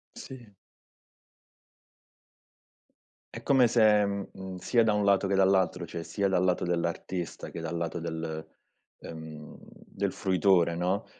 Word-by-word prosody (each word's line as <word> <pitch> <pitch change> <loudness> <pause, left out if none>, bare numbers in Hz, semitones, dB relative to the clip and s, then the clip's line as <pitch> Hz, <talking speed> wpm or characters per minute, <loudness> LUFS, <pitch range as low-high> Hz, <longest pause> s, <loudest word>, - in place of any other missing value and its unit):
Sì. 125 -4 -10 2.9
È - - -8
come 130 -3 +4
se, 110 -3 +4
mhmm, 100 -1 -3
mhmm, 95 -1 -8
sia 115 +5 +2
da 110 -2 +2
un 105 -1 +1
lato 100 0 +3
che 95 - +1
dall'altro, 95 -2 +2
cioè 85 0 -6
sia 100 +2 -1
dal 90 -1 +2
lato 90 -1 +1
dell'artista 85 0 -3
che - - -7
dal 80 0 -4
lato 85 0 -3
del 80 -1 -5 0.5
ehm, 80 -2 -10
del - - -5
fruitore, 90 -2 +2
no, 90 +4 -1
95 Hz, 135 wpm, -28 LUFS, 85-100 Hz, 2.9 s, come